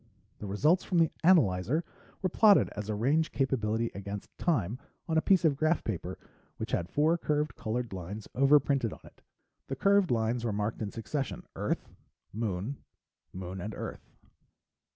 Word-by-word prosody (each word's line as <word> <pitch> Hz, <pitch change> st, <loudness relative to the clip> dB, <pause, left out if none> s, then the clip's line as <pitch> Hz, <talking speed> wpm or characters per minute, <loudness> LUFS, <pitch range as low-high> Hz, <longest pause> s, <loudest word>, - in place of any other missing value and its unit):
The 105 Hz, -, -6 dB
results 150 Hz, -, +3 dB
from 180 Hz, -, -1 dB
the 165 Hz, -2 st, +4 dB
analyzer 140 Hz, -, +4 dB, 0.4 s
were 185 Hz, -, +2 dB
plotted 205 Hz, +3 st, +5 dB
as 105 Hz, 0 st, -6 dB
range 135 Hz, +10 st, +1 dB
capability 115 Hz, -4 st, 0 dB
against 100 Hz, +1 st, -7 dB
time 125 Hz, -, 0 dB, 0.3 s
on 160 Hz, -, -1 dB
a 160 Hz, -, +4 dB
piece 185 Hz, -2 st, +3 dB
of 150 Hz, -3 st, +4 dB
graph 155 Hz, +4 st, +1 dB
paper 90 Hz, -3 st, -4 dB, 0.4 s
which -, -, -5 dB
had 85 Hz, 0 st, -1 dB
four 160 Hz, -, +2 dB
curved 150 Hz, -4 st, 0 dB
colored 115 Hz, 0 st, -3 dB
lines 95 Hz, +4 st, -6 dB
overprinted 135 Hz, -3 st, +3 dB
on -, -, -13 dB
it. -, -, -17 dB, 0.5 s
The 135 Hz, -, -3 dB
curved 200 Hz, -1 st, +3 dB
lines 115 Hz, 0 st, 0 dB
were 115 Hz, -, 0 dB
marked 105 Hz, +2 st, -2 dB
in 105 Hz, -, -2 dB
succession: 130 Hz, +6 st, -4 dB
"Earth," -, -, -2 dB, 0.5 s
"Moon," 110 Hz, +4 st, -3 dB, 0.5 s
"Moon" 95 Hz, 0 st, -6 dB
and 105 Hz, +4 st, -5 dB
"Earth." -, -, -7 dB
120 Hz, 155 wpm, -30 LUFS, 105-155 Hz, 0.5 s, plotted